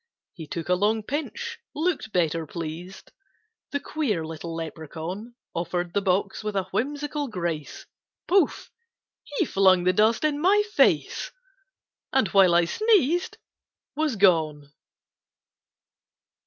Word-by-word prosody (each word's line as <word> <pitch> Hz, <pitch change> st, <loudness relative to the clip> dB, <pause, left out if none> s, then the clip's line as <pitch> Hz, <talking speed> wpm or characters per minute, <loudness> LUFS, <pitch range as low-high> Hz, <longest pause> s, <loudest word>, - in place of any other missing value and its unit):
He 160 Hz, -3 st, -9 dB
took 165 Hz, +1 st, -5 dB
a 180 Hz, -, +3 dB
long 210 Hz, +4 st, +1 dB
pinch, 460 Hz, -, -4 dB, 0.2 s
look'd 315 Hz, -8 st, -1 dB
better 165 Hz, -3 st, 0 dB
pleased, 170 Hz, +4 st, -7 dB, 0.6 s
The 285 Hz, -, -2 dB
queer 250 Hz, -, -2 dB
little 165 Hz, +1 st, -6 dB
Lepracaun; 165 Hz, +7 st, -6 dB, 0.2 s
Offer'd 175 Hz, +1 st, -2 dB
the 200 Hz, -, +1 dB
box 195 Hz, +2 st, 0 dB
with 210 Hz, -1 st, -3 dB
a 195 Hz, -, +1 dB
whimsical 290 Hz, +3 st, -2 dB
grace, 170 Hz, -, -4 dB, 0.4 s
Pouf! 365 Hz, -4 st, +2 dB, 0.7 s
he -, -, +3 dB
flung 190 Hz, -2 st, +4 dB
the 185 Hz, +1 st, +3 dB
dust 220 Hz, +6 st, +3 dB
in 300 Hz, -1 st, +1 dB
my 405 Hz, +4 st, +4 dB
face, -, -, +2 dB, 0.8 s
And, 265 Hz, -8 st, +2 dB
while 185 Hz, -1 st, +5 dB
I 170 Hz, 0 st, +5 dB
sneezed, 355 Hz, -, +2 dB, 0.6 s
Was 305 Hz, -4 st, 0 dB
gone! 155 Hz, -7 st, +2 dB
195 Hz, 120 wpm, -25 LUFS, -, 0.8 s, while